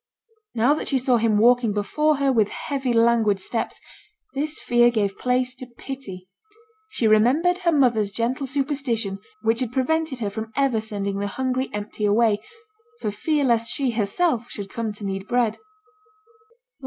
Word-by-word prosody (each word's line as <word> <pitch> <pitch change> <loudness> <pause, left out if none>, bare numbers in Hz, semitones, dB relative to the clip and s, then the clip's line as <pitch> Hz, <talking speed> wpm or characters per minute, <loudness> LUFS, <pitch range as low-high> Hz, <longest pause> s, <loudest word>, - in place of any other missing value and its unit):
Now 240 +5 +4
that 305 - -4
she 275 - +1
saw 255 -1 +2
him 225 -2 +2
walking 235 0 +4
before 300 +9 +1
her 275 -1 +2
with 220 -4 +3
heavy 270 -3 -3
languid 230 -3 +3
steps, 225 +4 -3 0.5
this 300 +3 -2
fear 240 0 +3
gave 205 -4 0
place 250 0 0
to 255 0 -10
pity; 240 -7 -9 0.6
she 435 - -2
remembered 270 +12 +3
her 350 -2 +2
mother's 240 -9 +2
gentle 250 +5 -1
superstition 265 -7 -1 0.2
which 225 +1 +2
had 250 -3 -2
prevented 280 +2 0
her 205 -3 -2
from 220 +2 -6
ever 270 -5 +1
sending 200 -2 -3
the 205 - -1
hungry 260 +4 -2
empty 210 0 -4
away, 210 0 +3 0.6
for 210 - -2
fear 295 +8 0
lest 230 -3 +2
she 270 -3 0
herself 235 - 0
should 200 -2 -7
come 230 -3 -3
to 205 0 -8
need 195 0 -4
bread. 240 -3 +1
235 Hz, 160 wpm, -23 LUFS, 215-265 Hz, 0.6 s, Now